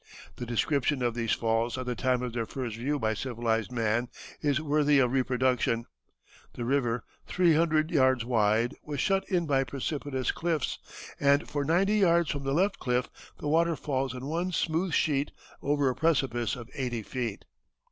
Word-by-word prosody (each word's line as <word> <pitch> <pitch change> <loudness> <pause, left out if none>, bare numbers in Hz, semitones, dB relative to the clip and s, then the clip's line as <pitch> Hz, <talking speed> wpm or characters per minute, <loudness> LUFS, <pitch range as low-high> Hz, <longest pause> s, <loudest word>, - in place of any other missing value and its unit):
The 120 - -5
description 135 +3 +1
of 120 -1 +1
these 115 -1 0
falls 115 +1 0
at 130 - -4
the 125 - -1
time 125 0 0
of 125 -2 -4
their 115 -2 -2
first 125 -5 -4
view 135 +6 -1
by 110 -5 0
civilized 115 -1 -1
man 115 0 0 0.3
is 145 -1 +2
worthy 150 -1 +3
of 125 -3 +3
reproduction. 125 -3 +1 0.7
The 120 - -4
river, 125 -2 0 0.2
three 175 -2 +3
hundred 155 0 +2
yards 130 -6 +3
wide, 115 +1 +2
was 145 -2 -5
shut 195 +4 +1
in 180 -3 +1
by 135 -3 +2
precipitous 135 0 -2
cliffs, 165 -5 -2 0.4
and 140 +1 +3
"for 145 -1 -2
ninety 190 +8 +2
yards 170 -4 +3
from 140 -1 -4
the 135 - 0
left 195 +6 +1
cliff 125 0 0 0.3
the - - -4
water 165 +2 +3
falls 135 -4 -2
in 125 +1 -6
one 170 +5 -1
smooth 170 +2 0
sheet 145 -1 +1 0.3
over 145 -1 +1
a 130 - +2
precipice 135 -5 +1
of 120 -3 -9
eighty 120 -4 -3
feet. 120 -3 -4
135 Hz, 175 wpm, -29 LUFS, 120-155 Hz, 0.7 s, worthy